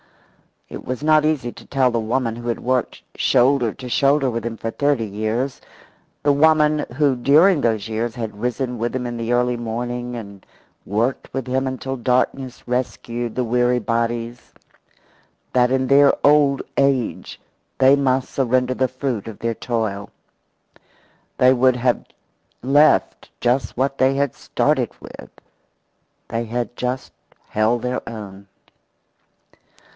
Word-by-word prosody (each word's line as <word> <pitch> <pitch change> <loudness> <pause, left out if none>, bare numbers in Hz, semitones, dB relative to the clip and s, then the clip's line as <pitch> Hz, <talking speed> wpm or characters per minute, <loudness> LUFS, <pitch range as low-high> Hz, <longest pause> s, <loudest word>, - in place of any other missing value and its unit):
It - - -9
was 130 +3 -4
not 155 0 +4
easy 145 -6 0
to - - -14
tell 130 -2 +1
the 115 - 0
woman 115 +1 -1
who 120 0 -7
had 120 - -2
worked 130 0 -1
shoulder 125 -2 +3
to 130 -2 -9
shoulder 140 +1 +2
with 115 -1 -3
him 115 -1 -4
for 115 - -4
thirty 140 -4 0
years, 110 +6 -2 0.6
the 145 - +4
woman 150 0 +3
who 145 -2 +2
during 155 +8 +5
those 110 -4 0
years 115 +1 -2
had 110 -3 -6
risen 125 0 -2
with 120 +2 -2
him 125 -1 -2
in 120 -1 -4
the 115 0 -3
early 125 0 +1
morning 120 +1 -4
and 100 -4 -9 0.4
worked 115 +6 -1
with 135 -1 -3
him 130 +1 -1
until 130 0 -4
darkness 125 +1 -1
rescued 120 -1 -3
the 125 - 0
weary 125 +1 +2
bodies, 115 +1 -3 1.0
that 125 -1 +4
in 130 0 +1
their 140 +2 +5
old 145 -1 +4
age 135 -4 0 0.4
they 135 +1 +6
must 130 -2 0
surrender 130 -1 +1
the 130 0 +1
fruit 130 -4 -4
of 110 - -8
their 115 0 -1
toil. 110 -4 -3 1.3
They 130 +1 +5
would 130 0 +3
have 125 0 0 0.6
left 145 +4 +3
just 125 +2 0
what 135 +2 0
they 130 +1 +3
had 140 -2 0
started - - 0
with. - - -11 1.0
They 115 +1 -2
had 120 +1 -4
just 125 +1 -3 0.4
held 110 +3 +1
their 125 0 -2
own. 100 -3 -9
125 Hz, 145 wpm, -21 LUFS, 115-135 Hz, 1.3 s, they